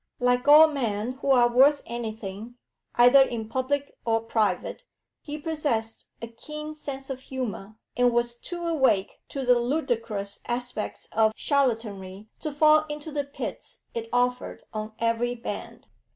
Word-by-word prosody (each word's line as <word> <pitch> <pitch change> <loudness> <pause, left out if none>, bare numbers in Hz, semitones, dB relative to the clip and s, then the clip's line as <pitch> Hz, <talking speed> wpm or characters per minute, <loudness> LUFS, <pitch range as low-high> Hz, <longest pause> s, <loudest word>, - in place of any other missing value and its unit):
Like 245 +1 +2
all 305 +2 +9
men 235 -6 -2
who 280 - -2
are 245 -3 +6
worth 270 +4 +4
anything, 220 -1 -6 0.4
either 245 +3 +7
in 235 -4 0
public 270 +4 -2
or 225 -1 +2
private, 220 - -1 0.4
he 295 0 -6
possessed 290 -8 -2 0.2
a - - -3
keen 300 +6 -8
sense 275 -3 -6
of 260 - -5
humour, 220 -6 -5 0.2
and 245 0 +4
was 240 0 +1
too 345 +8 -7
awake 265 - +1
to 275 -2 -4
the 250 -1 +5
ludicrous 230 -7 -2
aspects 245 -2 -4
of 220 0 +3
charlatanry 215 -7 -1
to 305 - -3
fall 310 +1 +4
into 295 +1 -6
the 290 -1 -2
pits 280 - -7
it 230 -1 -5
offered 245 0 0
on 215 0 -5
every 230 +1 0
band. 235 - -7
245 Hz, 145 wpm, -26 LUFS, 225-280 Hz, 0.4 s, all